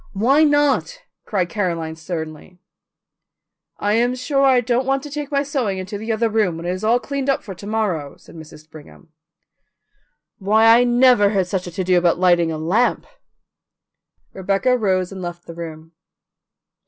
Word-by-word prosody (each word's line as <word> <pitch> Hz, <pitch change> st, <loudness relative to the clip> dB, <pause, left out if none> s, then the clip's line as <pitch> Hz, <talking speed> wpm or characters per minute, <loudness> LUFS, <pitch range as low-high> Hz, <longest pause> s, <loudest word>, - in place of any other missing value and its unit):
Why 260 Hz, +10 st, +3 dB
not?" 290 Hz, -, +1 dB, 0.3 s
cried 185 Hz, -4 st, -1 dB
Caroline 170 Hz, -6 st, -3 dB
sternly. 160 Hz, +1 st, -7 dB, 1.2 s
"I 205 Hz, +1 st, 0 dB
am 240 Hz, +3 st, +1 dB
sure 275 Hz, +2 st, -1 dB
I 265 Hz, -2 st, +5 dB
don't 245 Hz, +2 st, -1 dB
want 270 Hz, 0 st, 0 dB
to 295 Hz, -, -9 dB
take 295 Hz, 0 st, -5 dB
my 280 Hz, 0 st, +1 dB
sewing 255 Hz, -9 st, -2 dB
into 190 Hz, +2 st, -6 dB
the 220 Hz, +2 st, -4 dB
other 225 Hz, +1 st, +1 dB
room, 210 Hz, -6 st, 0 dB
when 165 Hz, -, -8 dB
it 175 Hz, -, -1 dB
is 185 Hz, +3 st, -5 dB
all 230 Hz, +3 st, +3 dB
cleaned 280 Hz, +1 st, -4 dB
up 275 Hz, -, 0 dB
for 200 Hz, -, -8 dB
to 195 Hz, +3 st, -11 dB
morrow," 195 Hz, -10 st, -2 dB
said -, -, -18 dB
Mrs. 155 Hz, -1 st, -13 dB
Brigham. 155 Hz, +2 st, -15 dB, 1.3 s
"Why, 215 Hz, +3 st, +3 dB
I 245 Hz, -, +3 dB
never 245 Hz, -4 st, +4 dB
heard 195 Hz, -3 st, 0 dB
such 185 Hz, 0 st, -4 dB
a -, -, -7 dB
to 185 Hz, -, -2 dB
do 180 Hz, 0 st, +3 dB
about 175 Hz, -1 st, +2 dB
lighting 175 Hz, -2 st, +3 dB
a 160 Hz, -, -4 dB
lamp." 185 Hz, +10 st, 0 dB, 1.3 s
Rebecca 195 Hz, +7 st, 0 dB
rose 190 Hz, -5 st, 0 dB
and 190 Hz, -1 st, -8 dB
left 175 Hz, -1 st, -7 dB
the 170 Hz, -, -9 dB
room. 165 Hz, -1 st, -9 dB
200 Hz, 175 wpm, -20 LUFS, 175-245 Hz, 1.3 s, I